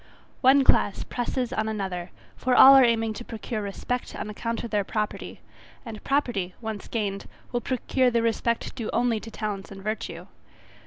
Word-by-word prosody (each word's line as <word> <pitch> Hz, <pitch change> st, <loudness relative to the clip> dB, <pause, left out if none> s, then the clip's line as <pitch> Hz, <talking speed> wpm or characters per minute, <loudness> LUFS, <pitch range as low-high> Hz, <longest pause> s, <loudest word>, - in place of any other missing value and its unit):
One 270 Hz, +1 st, +6 dB
class 205 Hz, -5 st, +3 dB
presses 245 Hz, 0 st, -3 dB
on 220 Hz, 0 st, -1 dB
another; 190 Hz, -4 st, -4 dB, 0.3 s
for 255 Hz, 0 st, +1 dB
all 270 Hz, +2 st, +10 dB
are 270 Hz, -1 st, +8 dB
aiming 225 Hz, -2 st, +2 dB
to 240 Hz, -, -7 dB
procure 225 Hz, -1 st, -5 dB
respect 210 Hz, +5 st, -4 dB
on 210 Hz, -, -5 dB
account 230 Hz, +2 st, -3 dB
of 235 Hz, -, -6 dB
their 205 Hz, -2 st, +1 dB
property: 210 Hz, +1 st, -4 dB, 0.4 s
and 220 Hz, -2 st, -8 dB
property, 235 Hz, -10 st, 0 dB
once 220 Hz, -3 st, -6 dB
gained, 200 Hz, -3 st, -3 dB, 0.2 s
will 240 Hz, -1 st, -1 dB
procure 255 Hz, 0 st, +1 dB
the 235 Hz, -1 st, +1 dB
respect 230 Hz, 0 st, 0 dB
due 230 Hz, -4 st, -5 dB
only 235 Hz, -2 st, +2 dB
to 225 Hz, -, -9 dB
talents 210 Hz, -3 st, -4 dB
and 195 Hz, -1 st, -10 dB
virtue. 215 Hz, +1 st, -4 dB
225 Hz, 170 wpm, -26 LUFS, 210-245 Hz, 0.4 s, all